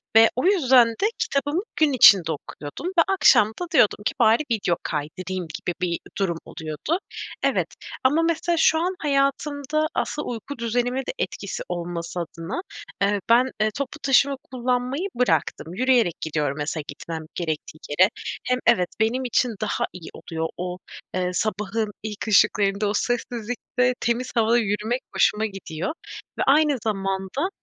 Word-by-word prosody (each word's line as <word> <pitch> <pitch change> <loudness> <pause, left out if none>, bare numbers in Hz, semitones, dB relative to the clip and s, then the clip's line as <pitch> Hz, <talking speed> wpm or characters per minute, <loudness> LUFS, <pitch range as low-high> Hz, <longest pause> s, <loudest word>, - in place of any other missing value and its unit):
ve 225 0 +8
o 255 - -1
yüzden 265 - +5
de 230 - -2
kitabımı 290 +6 0
gün 290 -2 +3
içinde 190 -9 +7
okuyordum 145 - -7
ve 370 -2 +3
akşam 385 - +5
da 355 - -1
diyordum 210 -7 +4
ki, - - +1
"Bari 225 +6 +5
video 200 -6 +1
kaydırayım." 175 +4 -4
gibi 175 - -3
bir 170 -2 0 0.2
durum 185 -4 0
oluyordu. 160 - -3 0.4
Evet. - - +2 0.4
Ama 295 +5 +4
mesela, 335 +1 0
şu 320 0 +4
an 360 +3 -1
hayatımda 285 +1 0
asıl 300 - -2
uyku 245 +4 -6
düzenime 245 +2 0
de 265 - -3
etkisi - - -4
olması 170 0 -4
adına, 170 - -5 0.4
eee, 200 0 +2
ben, 250 +3 +5
eee, 215 - +3
toplu 280 -2 -4
taşıma 275 +1 +4 0.2
kullanmayı 255 +7 -1
bıraktım. 235 -8 0
Yürüyerek 240 -4 +2
gidiyorum, 150 -2 -1
mesela, 150 +1 -3
gitmem 165 -1 -6
gerektiği 155 -2 -4
yere. 185 +7 +4 0.4
Hem 250 0 +1
evet, 185 -7 +4
benim 240 +4 +1
için 245 -1 +1
daha 215 - 0
iyi 180 -3 -9
oluyor. 160 -1 -4
O 180 0 -4 0.6
sabahın 210 +2 -1
ilk 215 0 -5
ışıklarında, 205 -1 +3
o 205 - 0
sessizlikte, 245 +2 -1
temiz 240 +2 -1
havada 230 +1 +4
yürümek 220 +3 0
hoşuma 210 +3 +3
gidiyor 190 - -5 0.5
ve - - +3
aynı 290 0 +4
zamanda, 195 - -2
225 Hz, 145 wpm, -24 LUFS, 185-270 Hz, 0.6 s, ve